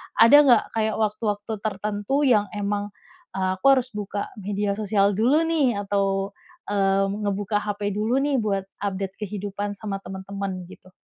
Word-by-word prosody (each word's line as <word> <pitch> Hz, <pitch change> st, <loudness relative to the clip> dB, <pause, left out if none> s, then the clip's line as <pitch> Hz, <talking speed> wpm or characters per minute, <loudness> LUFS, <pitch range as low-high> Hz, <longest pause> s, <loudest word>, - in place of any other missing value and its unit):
ada 230 Hz, +6 st, +8 dB
nggak 245 Hz, -5 st, +6 dB
kayak 220 Hz, -1 st, +1 dB
waktu-waktu 210 Hz, 0 st, -1 dB
tertentu 210 Hz, +6 st, -1 dB
yang 225 Hz, -7 st, +4 dB
emang, 205 Hz, 0 st, -2 dB, 0.4 s
eee, 190 Hz, -1 st, 0 dB
"Aku 185 Hz, -, -13 dB
harus 255 Hz, -2 st, 0 dB
buka 205 Hz, -1 st, -4 dB
media 200 Hz, 0 st, -2 dB
sosial 205 Hz, -1 st, +2 dB
dulu, 265 Hz, +9 st, +3 dB
nih, 275 Hz, -10 st, +1 dB
atau, 195 Hz, -1 st, 0 dB, 0.4 s
eee, 195 Hz, -1 st, +2 dB
ngebuka 205 Hz, 0 st, -1 dB
HP 205 Hz, 0 st, -2 dB
dulu, 215 Hz, +5 st, 0 dB
nih, 285 Hz, -1 st, +1 dB
buat 195 Hz, -3 st, -1 dB, 0.2 s
update 195 Hz, -1 st, -3 dB
kehidupan 205 Hz, 0 st, -4 dB
sama 205 Hz, -2 st, -4 dB
teman-teman." 190 Hz, 0 st, -5 dB
Gitu? 185 Hz, 0 st, -15 dB
205 Hz, 145 wpm, -24 LUFS, 195-215 Hz, 0.4 s, ada